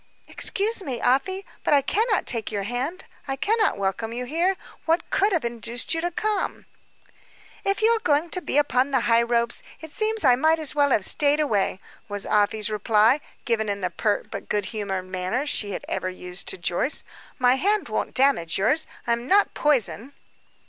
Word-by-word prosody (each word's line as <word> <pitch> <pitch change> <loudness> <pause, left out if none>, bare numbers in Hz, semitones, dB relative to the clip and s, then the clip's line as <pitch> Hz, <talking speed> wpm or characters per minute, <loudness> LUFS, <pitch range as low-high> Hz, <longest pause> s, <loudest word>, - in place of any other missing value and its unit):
"Excuse 425 +2 -2
me, 260 -9 -4
Afy, 375 +12 +1 0.2
but 295 - +4
I 280 - +3
cannot 425 - +1
take 230 -3 -3
your 200 -1 -2
hand, 255 - -3 0.2
I 270 - -1
cannot 430 - +1
welcome 200 +3 -2
you 245 +2 -4
here. 345 +8 0 0.3
What 330 +1 +1
could 405 +2 +2
have 330 -9 0
induced 235 0 0
you 325 - -1
to 350 - -1
come?" 420 +4 -2 1.0
"If 395 +2 0
you 445 - +6
are 460 - +2
going 310 -3 +1
to 365 - -3
be 290 - -1
upon 275 -2 +2
the 265 -3 +1
high 230 0 +4
ropes, 235 0 +1 0.2
it 320 -1 -10
seems 435 +1 -1
I 250 -2 +6
might 315 +5 +3
as 310 -3 +1
well 290 -1 +3
have 210 -7 +2
stayed 295 0 +4
away," 205 -10 0 0.3
was 205 -1 -3
Afy's 210 +1 +1
reply, 215 +5 +3 0.2
given 220 -3 0
in 200 0 -3
the 180 -1 -1
pert, 210 +4 -1
but - - -7
good 205 -2 0
humored 195 -3 -3
manner 185 +8 -2
she 215 -8 0
had 200 - -5
ever 185 - -2
used 180 0 -5
to - - 0
Joyce. 175 - 0 0.3
"My 250 0 +3
hand 410 +7 +1
won't - - -3
damage 255 -12 +3
yours. 265 +11 +2 0.2
I - - 0
am 235 +1 -1
not 405 +5 +3
poison." 275 -2 0
255 Hz, 190 wpm, -24 LUFS, 215-325 Hz, 1.0 s, you